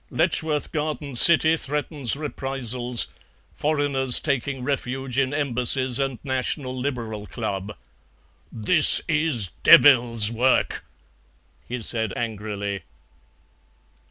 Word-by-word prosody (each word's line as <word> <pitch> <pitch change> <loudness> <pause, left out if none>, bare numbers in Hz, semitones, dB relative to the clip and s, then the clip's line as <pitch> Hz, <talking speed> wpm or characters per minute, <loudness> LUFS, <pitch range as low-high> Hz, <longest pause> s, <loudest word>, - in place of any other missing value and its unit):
Letchworth 155 -2 -2
Garden 150 -2 -5
City 160 +5 +6
threatens 145 -3 -4
reprisals. 130 -4 -3 0.5
Foreigners 145 -4 +3
taking 140 -2 -4
refuge 135 -1 -4
in 135 -1 -1
Embassies 130 -2 +1
and 135 -2 -3
National 130 0 -3
Liberal 120 -6 -6
Club." 100 -2 -6 0.7
"This 145 +8 +5
is 155 - 0
devils' 120 -6 +5
work!" 125 +3 -1 0.8
he 125 -1 -6
said 110 -2 -1
angrily. 105 -3 -5
130 Hz, 90 wpm, -22 LUFS, 115-145 Hz, 0.8 s, City